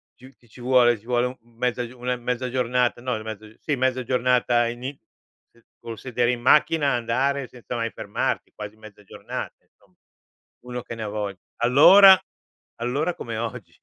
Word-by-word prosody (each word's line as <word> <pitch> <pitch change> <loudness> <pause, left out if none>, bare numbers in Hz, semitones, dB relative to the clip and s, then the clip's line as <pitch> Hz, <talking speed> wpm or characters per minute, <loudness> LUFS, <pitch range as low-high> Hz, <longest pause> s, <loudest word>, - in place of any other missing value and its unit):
più 130 +2 -16
ti 120 - -27
ci 125 - -15
vuole 120 -2 +4
ci 110 - -25
vuole 125 0 +1
un 125 - -7 0.2
mezza 125 0 -1
una 125 0 -2
mezza 125 +1 -3
giornata 125 -1 0
no, 125 -4 -3
mezza 110 -1 -7
uhm, 110 - -16
sì, 150 - -2
mezza 130 -1 0
giornata 125 -1 +2
ini 120 +3 -5 0.6
eh, 115 - -27 0.2
col 115 -1 -8
sedere 125 -1 0
in 120 - -4
macchina, 145 +3 +4
andare 130 +3 0
senza 120 0 -8
mai 115 -1 -2
fermarti, - - -3
quasi 105 0 -8
mezza 110 -1 -15
giornata, - - -7
insomma. - - -32 0.7
Uno 125 0 -5
che 115 - -8
ne 110 - -6
ha - - -4
vogl 100 -2 -4 0.2
allora, 185 +11 +8 0.6
allora 140 +9 -1
come 115 -2 -6
oggi. 115 -1 -6
125 Hz, 175 wpm, -24 LUFS, 115-130 Hz, 0.7 s, allora